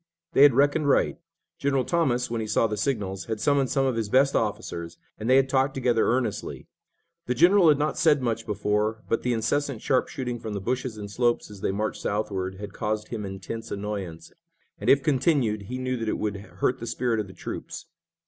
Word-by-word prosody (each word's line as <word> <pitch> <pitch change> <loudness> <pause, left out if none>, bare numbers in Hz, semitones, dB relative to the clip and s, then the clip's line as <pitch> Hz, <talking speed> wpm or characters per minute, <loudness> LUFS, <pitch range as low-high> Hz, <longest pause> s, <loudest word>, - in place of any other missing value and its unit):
They - - +4
had 140 -4 +8
reckoned 145 +2 +3
right. - - +2 0.4
General 135 -2 +1
Thomas, 130 -9 +1
when 115 -1 -1
he 110 - -4
saw 105 +2 +2
the 105 -1 -1
signals, 100 -5 -2
had 110 -2 -3
summoned 140 0 +2
some 135 -1 +1
of 130 -3 +1
his 110 -3 -2
best 135 +3 +4
officers 90 -6 -2 0.2
and 110 +3 -3
they 130 - +6
had 135 0 +5
talked 135 +1 +1
together 120 -3 +2
earnestly. 120 -4 -1 0.6
The 125 - 0
general 180 +6 +6
had 150 - +5
not 150 +1 -1
said 150 -3 +4
much 115 -3 -2
before, 105 +1 -1
but 115 - 0
the 125 - 0
incessant 130 +2 -1
sharpshooting 125 -1 -1
from 110 -2 -6
the - - -2
bushes 125 +3 -3
and 100 -1 -7
slopes 120 -1 0
as 100 -2 -11
they - - 0
marched 105 +2 -3
southward 95 -2 -2
had 100 +1 -8
caused 105 -1 -3
him 110 -3 -4
intense 95 +4 -6
annoyance, 100 -5 -5 0.5
and, - - -1
if 135 0 +5
continued, 130 - +1
he 125 - -3
knew 130 0 -2
that 115 -2 -2
it - - -1
would 105 -1 -2
hurt 100 +6 -2
the 115 - -6
spirit 120 -2 0
of 105 - -3
the 95 - -12
troops. - - -7
115 Hz, 205 wpm, -26 LUFS, 105-135 Hz, 0.6 s, had